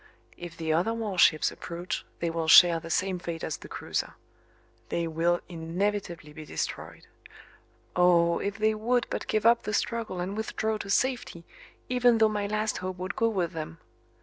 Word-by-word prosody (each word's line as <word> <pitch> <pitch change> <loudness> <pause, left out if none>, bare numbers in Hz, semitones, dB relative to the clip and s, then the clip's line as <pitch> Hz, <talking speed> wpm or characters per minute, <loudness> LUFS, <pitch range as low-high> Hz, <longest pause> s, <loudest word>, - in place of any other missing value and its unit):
If 175 -1 -9
the 160 -1 -1
other 185 +8 +1
warships 190 -8 +3
approach 170 +1 -5 0.2
they 170 -1 0
will 165 -1 -2
share 170 +1 +8
the 165 0 -10
same 185 +2 0
fate 170 -2 -6
as 155 - -3
the - - -12
cruiser. - - -4 0.7
They 170 - -1
will 170 +2 +1
inevitably 170 -1 -3
be 155 - -9
destroyed. - - -5 0.9
Oh! 170 -1 +4
if 200 +1 -3
they 220 0 +2
would 240 +3 0
but - - -3
give 215 0 0
up 235 0 +5
the 210 - -4
struggle 230 -6 -2
and 185 +3 -3
withdraw 220 0 -2
to 200 - -7
safety, 245 -7 0 0.4
even 245 -2 +3
though 220 -1 +4
my 205 -1 -2
last 215 +1 -1
hope 185 0 -5
would 185 +2 -4
go 230 - +2
with 185 -6 -1
them! 165 +1 -6
185 Hz, 175 wpm, -28 LUFS, 170-215 Hz, 0.9 s, share